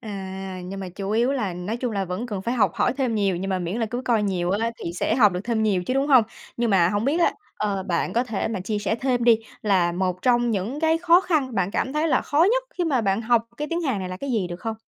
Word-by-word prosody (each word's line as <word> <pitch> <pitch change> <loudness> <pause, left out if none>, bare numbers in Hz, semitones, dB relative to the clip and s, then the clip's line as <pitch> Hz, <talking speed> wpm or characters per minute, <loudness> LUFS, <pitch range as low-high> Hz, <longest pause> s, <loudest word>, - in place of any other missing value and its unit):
À, 190 -3 -6
nhưng 195 +2 -6
mà 190 - -5
chủ 195 +2 -5
yếu 235 +5 +2
là 215 -9 -1
nói 180 +6 -4
chung 240 -1 -3
là 200 -2 -1
vẫn 185 +6 -4
cần 205 -5 -4
phải 235 +5 -1
học 235 - +2
hỏi 245 - +1
thêm 255 -5 0
nhiều, 200 -4 +1
nhưng 190 +3 -4
mà 190 - 0
miễn 175 +3 -3
là 225 - +1
cứ 245 +3 -4
coi 230 -3 +2
nhiều 180 -3 -1
á, 225 +4 0
thì 170 - -3
sẽ 180 +5 0
học 215 -6 +5
được 180 - -3
thêm 230 -2 0
nhiều 200 -4 +1
chứ, 255 - -1
đúng 270 +1 +1
hông? 260 -6 +6 0.3
Nhưng 235 -1 0
mà 180 -4 +4
hổng 205 +3 -1
biết 300 +6 +1
á, - - +3 0.2
ờ, 200 -2 -1
bạn 175 -2 -1
có 240 +2 +1
thể 220 -5 -2
mà 220 -4 -3
chia 210 +3 -2
sẻ 205 +1 -1
thêm 245 0 0
đi, 235 -2 +6 0.2
là 185 -5 +2
một 180 0 -2
trong 240 -1 +3
những 220 +7 -2
cái 320 0 +3
khó 345 +1 +5
khăn, 300 -10 0
bạn 185 -3 0
cảm 260 - -1
thấy 305 +2 +1
là 265 - +3
khó 310 +4 +3
nhất - - +1 0.2
khi 355 - +1
mà 280 -7 +1
bạn 200 0 0
học 230 0 +2
cái 300 +2 -4
tiếng 335 +1 -1
Hàn 265 -10 -1
này 185 -1 -4
là 185 - -5
cái 275 +8 -5
gì 215 -7 0
được 175 +1 -7
không? 225 +1 -3
220 Hz, 295 wpm, -24 LUFS, 190-250 Hz, 0.3 s, hông